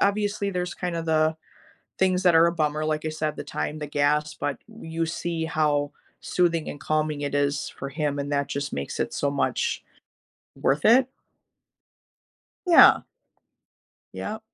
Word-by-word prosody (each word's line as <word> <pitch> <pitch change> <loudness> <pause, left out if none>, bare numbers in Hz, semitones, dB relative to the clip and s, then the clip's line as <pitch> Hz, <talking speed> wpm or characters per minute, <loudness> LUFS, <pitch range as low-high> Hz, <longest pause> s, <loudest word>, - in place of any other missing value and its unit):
obviously, 205 0 +1
there's 180 -2 -3
kind 175 -2 -3
of 165 0 -4
the 155 0 +2 0.6
things 185 -1 +2
that 175 -2 +5
are 165 +1 +6
a 170 - +1
bummer, 155 -2 -1
like 155 0 -1
I - - -1
said, 155 -1 -3
the - - -6
time, 150 +1 -4
the 150 - -4
gas, 150 +1 +1
but 145 - -3
w 220 -7 -11
you 165 - +2
see 165 0 -3
how 150 -2 +1 0.3
soothing 170 -3 +1
and 145 - -9
calming 155 -1 -1
it 145 0 -3
is 145 0 0
for 135 - -4
him, 145 -1 -2
and 140 +1 -3
that 140 0 0
just 140 0 -3
makes 70 - -4
it - - -1
so 140 - 0
much, 140 - -1 0.8
worth 145 +2 +1
it? 250 +3 +6 1.6
Yeah. 345 - +7 1.1
Yep. 220 +1 -5
155 Hz, 165 wpm, -25 LUFS, 145-175 Hz, 1.6 s, Yeah